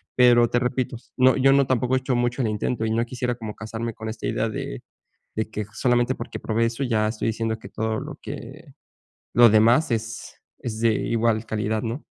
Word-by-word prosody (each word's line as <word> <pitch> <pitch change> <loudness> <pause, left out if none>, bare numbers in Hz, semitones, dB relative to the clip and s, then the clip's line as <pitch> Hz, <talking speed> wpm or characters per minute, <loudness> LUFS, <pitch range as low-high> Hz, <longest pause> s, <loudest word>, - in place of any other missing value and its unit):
pero 120 -1 +6
te 120 - +2
repitos, 125 -1 -3
¿no?, 130 0 +5
yo 135 +1 +5
no, 140 0 +4
tampoco 130 0 +1
he 130 - +2
hecho 130 -1 -1
mucho 120 +2 0
el 110 - +1
intento, 110 +2 -1
y 110 - -1
no 115 +1 +2
quisiera 125 0 -2
como 110 -3 -7
casarme 110 +1 -5
con 110 - -7
esta 110 +1 -5
idea 110 - 0
de - - -5 0.5
de 110 0 -2
que 105 -1 -4
solamente, 120 0 +2
porque 120 - -6
probé 115 +1 0
eso 115 +4 -2
ya 110 -4 +1
estoy 110 +1 -2
diciendo 110 0 -2
que - - -10
todo 110 0 -2
lo - - -8
que - - -8 0.7
lo 120 -1 +8
demás 115 +8 +4
es 115 0 -4 0.2
es 110 -2 -5
de 115 - +4
igual 115 0 0
calidad, 110 0 -1
¿no? 120 +5 -4
115 Hz, 205 wpm, -24 LUFS, 110-125 Hz, 0.7 s, lo